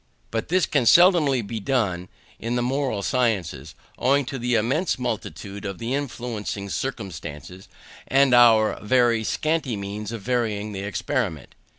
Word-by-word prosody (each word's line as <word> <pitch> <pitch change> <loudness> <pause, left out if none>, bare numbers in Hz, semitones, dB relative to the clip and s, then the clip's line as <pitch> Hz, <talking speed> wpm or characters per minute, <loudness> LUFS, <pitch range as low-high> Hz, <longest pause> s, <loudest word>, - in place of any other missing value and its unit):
But 115 -1 -2
this 180 +1 +2
can 135 -6 +1
seldom 175 - +6 0.2
be 110 +2 -4
done 100 -7 -1 0.3
in 115 +2 -2
the 120 - 0
moral 130 -5 -1
sciences, 95 - -1 0.2
owing 140 +2 +2
to 135 +1 -5
the 120 0 0
immense 130 - +1
multitude 110 -4 -5
of 100 -2 -5
the 115 +2 -3
influencing 120 -7 -4
circumstances, 95 - -6 0.4
and 135 0 +4
our 115 -3 +5
very 115 0 +2
scanty 155 0 -1
means 100 +2 -5
of 115 -4 -6
varying 110 -4 -1
the 100 - -5
experiment. 85 -6 -3
115 Hz, 145 wpm, -24 LUFS, 100-130 Hz, 0.4 s, seldom